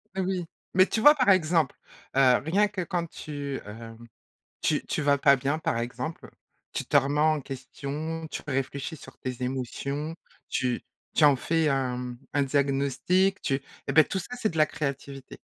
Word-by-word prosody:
Mais 190 - 0
oui. 185 -1 -1 0.3
Mais 185 +1 +6
tu 220 - -1
vois, 295 +5 +9
par 255 -6 +3
exemple, 165 -5 +3 0.4
heu, 130 -2 +6
rien 195 +8 +3
que 200 -2 -4
quand 175 0 -2
tu, 145 -3 -5
hem, 115 +2 -9 0.7
tu - - +1
tu - - -1
vas 140 0 +3
pas 140 0 +6
bien, 140 +4 -1
par 115 -7 -1
exemple, 125 +7 -5 0.4
tu - - -2
te - - +2
remets 145 +2 +3
en 155 0 +3
question, 140 +4 -5
tu - - -5
réfléchis 140 +3 -3
sur - - -13
tes 130 -1 -5
émotions, 140 +4 -3 0.3
tu 125 -2 -1 0.3
tu 155 - +4
en 145 -1 +7
fais 160 +4 +1
un, 135 -3 0
mmh, 125 -1 -6 0.2
un 145 - +3
diagnostic, 140 +8 +1
tu 135 -1 0 0.3
eh - - +1
beh 155 - +7
tout 190 - -3
ça, 245 +7 -6
c'est 220 -3 0
de 160 - -5
la 155 - +6
créativité 140 -2 -5
145 Hz, 180 wpm, -27 LUFS, 135-165 Hz, 0.7 s, vois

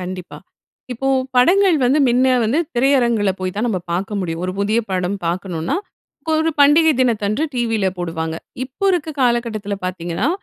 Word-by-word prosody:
கண்டிப்பா. 180 0 -7 0.5
இப்போ 260 +3 -4 0.3
படங்கள் 360 +7 +5
வந்து, 265 +5 +3
முன்ன 250 +2 +3 0.2
வந்து, 235 +8 +1 0.2
திரையரங்குல 240 -5 +2
போய் 185 -1 -3
தான் 225 - 0
நம்ம 200 -5 -1
பாக்க 190 +5 -2
முடியும். 165 -2 -4
ஒரு 185 - -2
புதிய 210 +3 +1
படம் 185 +1 -1
பாக்கணும்னா, 175 - -2 0.5
ஒரு 320 +1 +2
பண்டிகை 305 +3 +6
தினத்தன்று 220 0 +1
டிவில 225 -5 0
போடுவாங்க. 165 -2 -3 0.3
இப்போ 270 +9 -7
இருக்க 330 -3 -1
காலக்கட்டத்துல 230 -5 0
பாத்தீங்கன்னா, 180 +5 -2
220 Hz, 145 wpm, -19 LUFS, 185-260 Hz, 0.5 s, பண்டிகை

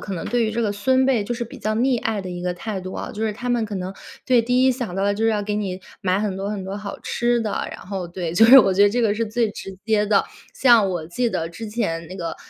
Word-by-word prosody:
可 200 - -6
能 170 - -5
对 240 -1 +1
于 220 - 0
这 235 +1 -1
个 215 - 0
孙 260 +6 +2
辈， 245 -6 +2
就 240 - -3
是 235 0 -3
比 230 - -11
较 215 0 -1
溺 245 +1 +1
爱 220 -2 -1
的 185 -1 -7
一 175 0 -6
个 180 0 -1
态 200 +2 -5
度 185 0 -7
啊， - - -5
就 220 +1 -2
是 215 - -1
他 240 +4 -6
们 240 -2 +1
可 210 -1 -6
能 185 0 -4 0.3
对， 250 -2 +4
第 250 +2 +2
一 260 - +5
想 245 -8 -5
到 195 - 0
的 200 - +2
就 220 +2 -1
是 225 - +4
要 210 -2 0
给 210 0 -2
你 190 -3 -3 0.2
买 185 +1 +1
很 205 -3 -2
多 195 +1 -3
很 205 -2 -4
多 190 +1 -5
好 205 -1 -7
吃 240 0 0
的， 215 -3 -2
然 - - -9
后， 190 -2 -4
对， 170 -1 -4
就 180 +6 +5
是 265 +4 +10
我 195 -2 +2
觉 195 +2 +4
得 205 - +6
这 240 +3 0
个 215 - +3
是 225 +1 -1
最 225 0 0
直 195 -2 -8
接 215 -1 +2
的。 205 -1 +3 0.3
像 235 -6 +5
我 170 -3 -4
记 235 +9 -1
得 165 -5 -2
之 220 +7 -8
前 170 -7 -2
那 185 - -8
个， 165 -3 -4
210 Hz, 325 characters per minute, -22 LUFS, 190-230 Hz, 0.3 s, 是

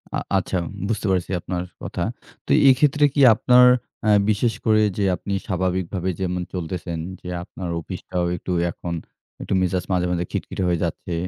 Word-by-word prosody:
আ - - +1 0.2
আচ্ছা, 95 0 -1 0.3
বুঝতে 110 -1 -2
পেরছি 90 -1 0
আপনার 90 0 -3 0.2
কথা। - - -3 0.4
তো - - -3 0.2
এক্ষেত্রে 145 +2 +4
কি 145 - +2
আপনার 125 +3 +5 0.4
অ্যা 110 - +3 0.2
বিশেষ 110 +2 +2
করে 110 -1 +4 0.2
যে, 100 - +1
আপনি 100 - -5
স্বাভাবিকভাবে 95 0 -1
যেমন 90 -1 -1
চলতেছেন 85 -1 -4 0.2
যে, - - -10 0.2
আপনার 90 0 -7
অফিসটাও 90 +2 -4
একটু 90 - -6 0.2
এখন 85 +1 -6 0.5
একটু - - -3
মেজাজ 90 0 0
মাঝে, 90 -1 +2
মাঝে 90 0 -1
খিটখিটে 95 - -3
হয়ে 85 -1 +1
যাচ্ছে। 85 +1 -3
95 Hz, 160 wpm, -22 LUFS, 90-105 Hz, 0.5 s, আপনার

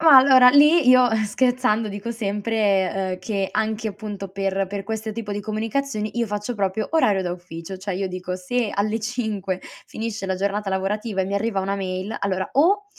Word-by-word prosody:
Ma 315 -4 +8
allora 260 -1 +8
lì 295 +1 +6
io, 255 -1 +6
eh, 220 -1 +1
scherzando, 245 -1 +1
dico 205 +3 -5
sempre, 200 -3 0
uhm, 185 - -10
che 195 0 -2
anche 220 0 -1
appunto 200 -1 -7
per 195 0 -1
per 200 -1 -5
questo 220 0 -4
tipo 210 -2 -5
di 205 - -3
comunicazioni 220 +2 -3
io 235 - +1
faccio 210 +3 -3
proprio 200 +1 -1
orario 205 -12 +3
da 175 - -2
ufficio, 175 +1 -8
cioè 190 +1 -4
io 195 +1 -2
dico 185 0 -5
se 220 +4 -1
alle 215 +3 0
5 215 -5 -3 0.3
finisce 220 -3 -5
la 190 - 0
giornata 200 +1 -1
lavorativa 195 +2 -1
e 190 - +1
mi 200 +1 -3
arriva 200 -1 0
una 195 +1 -2
mail 190 +1 -4
allora, 190 -1 -1
o 385 +9 +3
210 Hz, 190 wpm, -23 LUFS, 195-230 Hz, 0.3 s, Ma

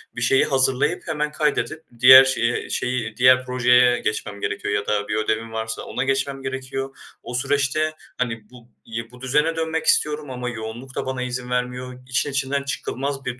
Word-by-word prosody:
bir 120 - -5
şeyi 130 +2 +4
hazırlayıp 135 +5 +1
hemen 150 0 -1
kaydedip, 155 +1 -1 0.2
diğer 130 +2 +10
şeye 120 -2 -1
şeyi 125 - -1 0.3
diğer 130 +1 +5
projeye 125 -1 +4
geçmem 105 -1 -3
gerekiyor 100 0 -2
ya 100 0 -1
da 105 -1 0
bir 105 - -2
ödevim 110 +1 -1
varsa 110 0 -4
ona 125 - -3
geçmem 135 0 -1
gerekiyor. 135 0 -5 0.3
O - - -7
süreçte 140 +4 0 0.2
hani 115 -4 -3
bu 120 -1 -16 0.2
y 115 +1 -6
bu 125 0 -15
düzene 150 +5 +1
dönmek 160 0 -2
istiyorum 150 -1 +1
ama 125 -1 -4
yoğunluk 115 +3 -7
da - - -2
bana 130 -1 -3
izin 125 0 -4
vermiyor. 125 +1 -3 0.2
İşin 135 +2 0
içinden 140 +1 -1
çıkılmaz 140 0 -4
bir 125 0 -4
130 Hz, 175 wpm, -22 LUFS, 120-135 Hz, 0.3 s, diğer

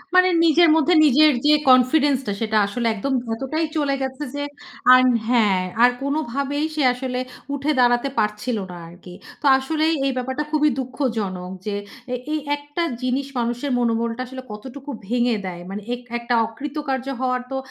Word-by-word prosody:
মানে 365 0 +6 0.2
নিজের 330 +1 +5
মধ্যে 320 +3 +3
নিজের 300 +2 +6
যে 300 - +6 0.2
কনফিডেন্সটা, 255 -2 +4
সেটা 220 -1 +1
আসলে 235 +3 -2
একদম 265 +6 -2 0.2
এতটাই 310 +7 -2
চলে 280 -2 +1
গেছে 265 +2 -4
যে, 285 - -2 0.5
আর 255 - +7 0.3
হ্যাঁ। 210 -6 +3 0.2
আর 245 - +8
কোনভাবেই 280 +1 -1
সে 300 - 0
আসলে 250 0 -4 0.3
উঠে 285 +2 -1
দাঁড়াতে 245 +2 +3
পারছিল 210 +3 -1
না 175 - -8
আরকি। 175 +1 -13 0.3
তো - - -7
আসলেই 315 +4 0
এই 270 - +2
ব্যাপারটা 260 +4 -2
খুবই 300 -1 +3
দুঃখজনক 220 -9 -3
যে, 205 -1 -2 0.6
এই 310 - 0 0.2
একটা 290 +4 -4 0.2
জিনিস 260 +2 -1
মানুষের 240 +4 -2
মনোবলটা 230 +1 0
আসলে 260 0 -8
কতটুকু 265 +6 -9 0.2
ভেঙে 240 0 +1
দেয়। 175 -1 -6
মানে 205 +2 -5
এক 245 - -11 0.2
একটা 235 +1 -2
অকৃতকার্য 270 +2 -4
হওয়ার 255 -1 0
তো, 265 - -2
260 Hz, 155 wpm, -22 LUFS, 235-290 Hz, 0.6 s, আর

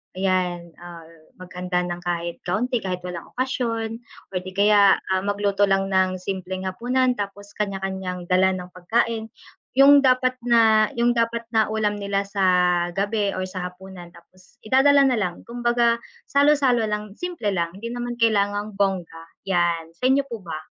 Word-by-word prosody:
ayan 180 -2 -1
ah, 170 -2 -11 0.3
maghanda 180 0 -3
nang 175 0 -4
kahit 170 -1 -3
kaunti 240 +7 0
kahit 180 -2 -4
walang 175 -2 -6
okasyon 230 -4 -2 0.3
or 185 - 0
di 185 - -8
kaya 200 -1 +5 0.2
ah 190 0 +2
magluto 200 0 -1
lang 195 0 +1
ng 185 0 +2
simpleng 185 0 -5
hapunan 250 +7 0
tapos 205 0 -6
kanya-kanyang 190 -3 -4
dala 185 +1 +4
ng 180 -1 -8
pagkain, 220 +5 -1 0.5
yung 280 +1 +8
dapat 255 -1 +3
na 225 -3 +4
yung 240 +1 +3
dapat 230 0 -1
na 220 -1 +3
ulam 210 -1 -1
nila 200 0 -1
sa 200 0 -4 0.6
gabi 205 +1 0
or 185 - -2
sa 185 -1 -5
hapunan 180 -1 -12
tapos 185 +5 -21
idadala 275 +4 +5
na 255 -3 +2
lang, 180 -3 -4
kumbaga 240 -1 +1 0.2
salo-salo 280 -4 +3
lang, 210 -1 -4
simple 330 - -3
lang 170 -2 -1
hindi 230 +3 -6
naman 240 0 -4
kailangang 205 -2 +1
bongga, 190 -4 -2 0.2
yan. 170 -3 0
Sa 250 +9 0
inyo 275 +1 +3
po 235 -5 -7
ba? 165 -4 -6
200 Hz, 155 wpm, -23 LUFS, 185-235 Hz, 0.6 s, yung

